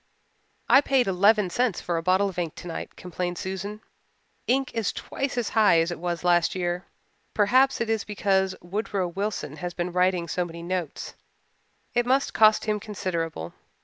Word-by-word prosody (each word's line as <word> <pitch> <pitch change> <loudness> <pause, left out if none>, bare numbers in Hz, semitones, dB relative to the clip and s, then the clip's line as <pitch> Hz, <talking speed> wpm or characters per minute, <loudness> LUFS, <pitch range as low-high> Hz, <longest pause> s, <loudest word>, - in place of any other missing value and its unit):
"I 270 - +7
paid 270 -3 +2
eleven 200 0 +3
cents 240 -2 +1
for 175 - -2
a 165 - 0
bottle 185 +3 +3
of 180 -2 -6
ink 165 -3 -3
tonight," 175 -2 -7
complained 180 0 -4
Susan. 195 +4 -5 0.7
"Ink 265 +1 +1
is 225 -3 0
twice 275 -2 -4
as 240 -3 0
high 210 -7 +5
as 165 +2 +1
it 175 - -5
was 175 0 -3
last 175 0 +3
year. 175 0 -2 0.5
Perhaps 255 +6 +4
it 235 - -1
is 225 -2 0
because 190 -2 0
Woodrow 195 0 -2
Wilson 185 -5 -4
has 175 +2 -5
been 175 0 -2
writing 180 -1 +1
so 180 - -1
many 170 -1 -8
notes. 175 -3 -4 0.8
It 240 0 +1
must 270 +2 +2
cost 215 -1 +5
him 210 -1 0
considerable. 170 - -4
185 Hz, 170 wpm, -26 LUFS, 175-215 Hz, 0.8 s, I